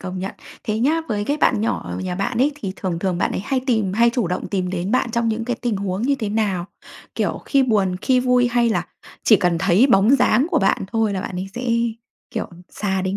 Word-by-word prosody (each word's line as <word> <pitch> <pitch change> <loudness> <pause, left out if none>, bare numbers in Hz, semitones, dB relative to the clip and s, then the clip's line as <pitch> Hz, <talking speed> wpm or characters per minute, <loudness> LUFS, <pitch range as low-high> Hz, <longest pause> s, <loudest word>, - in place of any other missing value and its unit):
công 185 0 -5
nhận. 190 +1 -4 0.3
Thế 215 0 -1
nhá, 300 +7 +2
với 205 -2 -1
cái 290 +6 0
bạn 300 - +2
nhỏ 225 - -1
ở - - -5
nhà 185 -1 -3
bạn 225 +5 -2
ấy, 280 +4 +3
thì 205 -10 -5
thường 180 -3 -3
thường 180 -1 -1
bạn - - +1
ấy - - -2
hay 265 +2 0
tìm 220 -7 +1
hay 235 +3 +4
chủ 235 -6 -1
động 180 - -3
tìm 185 -2 -1
đến 185 +1 -3
bạn 250 0 +1
trong 235 0 0
những 225 +1 -1
cái 245 0 -2
tình 235 -4 0
huống 195 0 -3
như 280 +3 +2
thế 230 -6 -3
nào? 200 -5 -1 0.5
Kiểu, - - -1
khi 275 -1 +3
buồn, 200 -7 +1
khi 255 +2 +2
vui, 250 -1 +3
hay 240 0 +2
là 225 - -1 0.4
chỉ 215 - +6
cần 175 -3 +1
thấy 190 +7 +4
bóng 210 -2 +4
dáng 255 +1 +3
của 340 - +3
bạn 195 0 +1
thôi 225 -2 +1
là 190 - -2
bạn 185 - -5
ấy 185 +2 -4
sẽ, 250 +1 -4 0.6
kiểu, - - -3 0.2
sà 190 -2 -2
đến 190 +1 -1
215 Hz, 250 wpm, -21 LUFS, 190-245 Hz, 0.6 s, chỉ